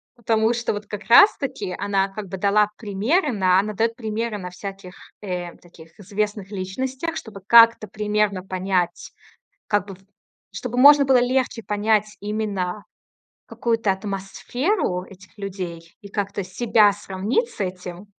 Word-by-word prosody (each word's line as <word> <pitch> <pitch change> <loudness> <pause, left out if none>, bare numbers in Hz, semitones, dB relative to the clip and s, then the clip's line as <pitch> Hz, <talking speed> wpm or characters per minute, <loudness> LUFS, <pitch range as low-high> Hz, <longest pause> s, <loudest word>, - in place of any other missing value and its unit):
Потому 225 -1 +1
что 240 -1 -1
вот 205 0 -5
как 210 0 -6
раз-таки 250 - +4
она, 200 -1 0
как 200 +1 -7
бы, 190 - -5
дала 205 +2 +3
примеры 240 - 0
на 185 -3 +3
она 210 +2 -2
даёт 230 +3 0
примеры 220 -1 -3
на 180 -2 -6
всяких, 195 0 -9 0.3
э, 180 -3 -5
таких 165 -1 -18
известных 205 0 -3
личностях. 260 - -4
Чтобы 205 -3 -9
как-то 230 0 +7
примерно 210 -2 0
понять, 185 -1 -2 0.6
как 205 -2 +1
бы, 195 -2 -9 0.6
чтобы 245 -1 -5
можно 285 +2 +8
было 265 -1 +5
легче 250 -1 0
понять 210 0 0
именно 205 -2 -3 0.6
какую-то 225 -4 0
атмосферу 195 - -2
этих 190 0 -16
людей 180 -4 -7
и 200 - -10
как-то 200 -1 -3
себя 210 +2 +3
сравнить 205 - -2
с - - -15
этим. 180 0 -5
205 Hz, 140 wpm, -22 LUFS, 190-230 Hz, 0.6 s, можно